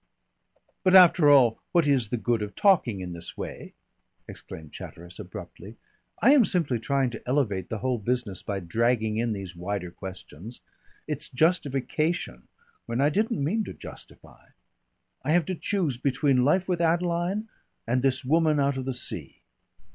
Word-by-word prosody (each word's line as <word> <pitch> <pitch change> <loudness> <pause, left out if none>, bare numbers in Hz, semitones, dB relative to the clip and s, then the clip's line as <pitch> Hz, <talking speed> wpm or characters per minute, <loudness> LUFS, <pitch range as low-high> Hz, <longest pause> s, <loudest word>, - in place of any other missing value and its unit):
"But, 185 -1 +4
after 175 -4 +7
all, 125 -6 +5
what 170 -3 +4
is 135 -7 +2
the 120 - -1
good 115 -1 0
of 105 -1 -5
talking 145 - +3
in 90 -1 -6
this 85 0 -8
way?" - - -7 0.5
exclaimed 80 -2 -10
Chatteris 85 +1 -10
abruptly. - - -10 0.5
"I 250 - +7
am 280 -5 +6
simply 160 - 0
trying 135 +1 0
to 115 - -8
elevate 115 - 0
the 110 - -3
whole 125 -2 0
business 115 -3 -2
by 100 -2 -4
dragging 110 +4 0
in 115 0 0
these 95 -3 -7
wider 90 0 -4
questions. 95 +4 -10 0.5
It's 150 0 -4
justification, 150 - 0 0.4
when 115 +1 -2
I 140 +2 +4
didn't 215 - 0
mean 210 +10 0
to - - -7
justify. - - -13 0.7
I 150 +4 0
have 175 -2 +3
to 185 - -3
choose 175 -7 -1
between 135 0 +2
life 180 +7 +2
with 180 -2 0
Adeline 175 +5 0 0.4
and 125 +2 +1
this 130 0 0
woman 155 +1 +3
out 140 -1 +1
of 130 - -4
the 130 -1 -3
sea." - - -5
130 Hz, 160 wpm, -26 LUFS, 110-165 Hz, 0.7 s, after